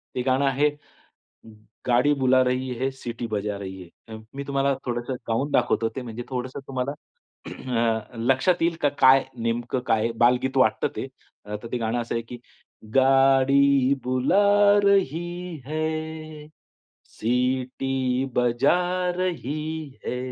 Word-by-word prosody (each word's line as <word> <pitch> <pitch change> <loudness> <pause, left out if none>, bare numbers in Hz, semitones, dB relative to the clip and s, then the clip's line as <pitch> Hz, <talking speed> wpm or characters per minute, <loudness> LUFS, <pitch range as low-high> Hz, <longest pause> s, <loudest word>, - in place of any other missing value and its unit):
ते 125 - -1
गाणं 130 +2 +1
आहे, 140 +2 +2 1.2
गाडी 125 +4 +4
बुला 130 0 +4
रही 125 +1 -1
है, 135 - 0
सिटी 120 -3 -6
बजा 105 -1 -2
रही 95 -2 -8 0.2
है. 110 - -7 0.2
मी 140 +1 -5
तुम्हाला 140 0 +1
थोडंसं 120 +1 -3
गाऊन 125 +6 -1
दाखवतो 115 -4 +2
ते, 130 - -3
म्हणजे 120 0 -7
थोडंसं 130 +1 -4
तुम्हाला 130 0 -2 0.6
अ, 115 -2 -2
लक्षात 135 +10 +2
येईल 170 0 +2
का 145 - +3
काय 130 +1 +7 0.2
नेमकं 120 +2 -1
काय 115 +1 +2
बालगीत 125 +2 +2
वाटतं 130 - +3
ते. - - -4 0.4
अ, 105 0 -5
तर 115 - -6
ते 125 - -1
गाणं 115 +1 -1
असं 115 - -4
आहे 115 - -1
की, 120 - -7 0.6
गाडी 135 0 +4
बुला 200 +11 +4
रही 175 -2 0
है, 155 0 -4 0.6
सिटी 130 +2 -1
बजा 125 +5 +3 0.4
रही 155 -3 -3 0.2
है. 125 - -2
130 Hz, 135 wpm, -24 LUFS, 120-145 Hz, 1.2 s, काय